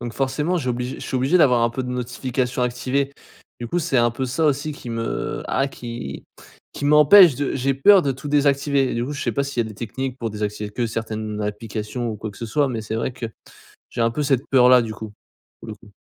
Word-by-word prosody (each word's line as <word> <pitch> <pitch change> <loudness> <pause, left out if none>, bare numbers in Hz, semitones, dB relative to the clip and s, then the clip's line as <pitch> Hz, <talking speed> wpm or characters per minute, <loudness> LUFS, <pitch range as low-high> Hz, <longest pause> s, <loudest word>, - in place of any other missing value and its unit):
donc 120 -1 -5
forcément 150 +6 0
j'oblige 125 -3 -2
je - - -10
suis - - -6
obligé 135 +7 +2
d'avoir 125 -7 +4
un 115 - +3
peu 130 +3 -3
de 125 - -5
notifications 125 0 -2
activées. 130 +3 -1 0.5
Du 120 - -5
coup 175 - 0
c'est 155 -5 -1
un 120 0 +3
peu 120 +3 -3
ça 130 +6 -1
aussi 145 +1 0
qui 125 -4 -9
me 115 0 -3
ah 135 - 0
qui 115 - -7 0.5
qui 145 - -6
m'empêche 150 +3 +7
de 145 +1 -2
j'ai 135 +1 0
peur 185 +8 +6
de 140 - 0
tout 135 - -10
désactiver 140 -1 +2
et - - -3
du 120 +1 -1
coup 145 - -5
je 140 - -5
sais - - 0
pas 140 - 0
s'il 135 -4 -1
y - - -6
a - - -7
des 110 - -10
techniques 130 +4 -5
pour 115 -2 -3
désactiver 105 0 -4
que 120 +3 -2
certaines 110 -1 -4
applications 105 +3 -4
ou 110 - -5
quoi 110 +1 -6
que - - -16
ce - - -5
soit 145 +5 +1
mais 115 -3 -4
c'est 110 +1 -4
vrai 120 +2 -2
que 120 -1 -5 0.7
j'ai 120 - -2
un 115 - +3
peu 150 +5 -2
cette 135 -1 0
peur-là 125 -1 +6
du 110 -1 -4
coup. 110 0 -9 0.5
Pour - - -12
le 110 - -6
coup. 105 -1 -19
125 Hz, 245 wpm, -22 LUFS, 115-140 Hz, 0.7 s, m'empêche